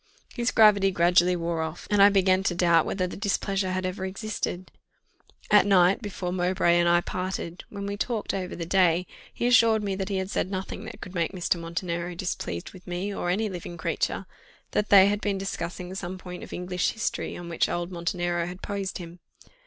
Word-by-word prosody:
His 240 0 0
gravity 205 -3 +5
gradually 175 0 +4
wore 170 -1 -2
off, 160 +1 -5
and 205 -1 +4
I 200 - +9
began 190 -1 +3
to 175 - +1
doubt 170 -2 +4
whether 185 -2 -1
the 180 - -6
displeasure 195 -1 -1
had 185 0 -2
ever 185 +1 -3
existed. 190 -2 -4 0.8
At 210 -1 +6
night, 190 0 +4
before 185 -4 -4
Mowbray 175 -1 +2
and 175 0 +3
I 175 0 +4
parted, 180 -1 -4
when 200 -1 -6
we 200 0 -3
talked 225 0 -2
over 185 -2 -3
the 170 - -4
day, 180 -1 +3 0.3
he - - -3
assured 230 -3 +5
me 200 -1 -1
that 190 +1 -3
he 195 - -1
had 190 +1 -3
said - - -1
nothing 190 +2 -5
that - - -9
could 180 - -8
make 170 0 -1
Mr. 180 -1 0
Montenero 170 +1 -3
displeased 165 - -4
with 180 - -14
me 180 +3 -3
or 175 - -2
any 210 +5 +1
living 175 -3 -7
creature; 160 - -2 0.5
that 210 - 0
they 195 -2 +8
had 205 +1 0
been 200 -2 0
discussing 180 -1 -5
some 185 -1 -5
point 180 -1 -8
of - - -10
English 180 0 -1
History, 225 - -3
on 175 - -8
which 170 -1 0
old 175 +1 -3
Montenero 175 -1 -1
had 180 +1 -9
posed 200 -2 -3
him. 175 0 -10
185 Hz, 200 wpm, -26 LUFS, 175-200 Hz, 0.8 s, I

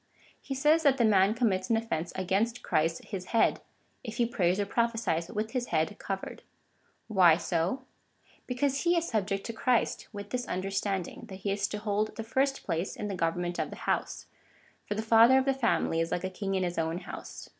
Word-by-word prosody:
He 270 - -5
says 300 +4 +4
that 280 -4 +4
the 240 - +3
ma7i 205 -1 +4
commits 195 -6 +1
an 225 - +3
offence 180 -7 -2
against 200 +6 0
Christ 165 +2 0
his 190 -3 -5
head, 230 - +2 0.4
if 225 -3 -6
he 240 - +3
prays 185 -5 +1
or 205 - +1
prophesies 225 -6 0
with 215 +1 -3
his 250 -2 -2
head 160 +6 0
covered. 195 -1 -5 0.7
Why 180 -7 +6
so? 175 +9 -1 0.6
Because 275 +2 0
he 345 0 +3
is 335 0 0
subject 195 -3 -1
to 230 - -4
Christ, 245 +1 0
with 205 -1 -8
this 250 -1 -2
understand 195 0 -1
ing, - - -10
that 190 -2 -10
he 200 - +1
is 200 0 0
to 210 - -4
hold 210 0 -1
the 225 - -4
first 270 +4 0
place 170 +1 -2
in 210 - -4
the - - -3
government 175 0 -1
of - - -1
the - - -8
house - - -1 0.3
— - - -32
for 205 - -2
the 220 - -2
father 230 +3 +6
of 265 - +2
the 270 - +3
family 235 -10 +1
is 165 0 -2
like 175 - -1
a 185 - -2
king 195 +1 -3
in 190 - +1
his 175 -1 -2
own 165 +1 -1
house. 185 - -8
205 Hz, 210 wpm, -29 LUFS, 185-235 Hz, 0.7 s, Why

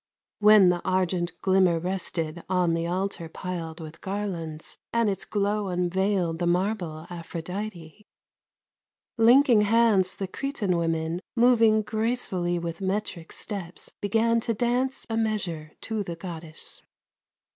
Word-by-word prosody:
When 210 -3 +7
the 175 -1 +1
argent 180 -2 0
glimmer 185 -3 +4
rested 170 -2 -3
On 180 -2 +2
the 165 0 -1
altar 185 -1 -2
piled 170 -2 -5
with 160 0 -9
garlands, 180 -6 -5
And 230 -1 +2
its 195 - -4
glow 205 0 0
unveiled 180 -1 0
the 175 - 0
marble 175 -3 -1
Aphrodite; 175 +2 -6 1.1
Linking 240 0 +6
hands, 210 -3 +3
the 195 - -4
Cretan 215 -4 -2
women 165 0 -1 0.2
Moving 230 -3 +5
gracefully 215 -6 -1
with 170 +1 -5
metric 190 -3 -3
Steps 190 -5 -5
began 225 +3 +2
to 230 0 -1
dance 250 +4 0
a 225 - -2
measure 190 -9 -2
To 220 -1 -2
the 175 -4 -4
Goddess. 165 -2 -7
185 Hz, 125 wpm, -26 LUFS, 170-215 Hz, 1.1 s, When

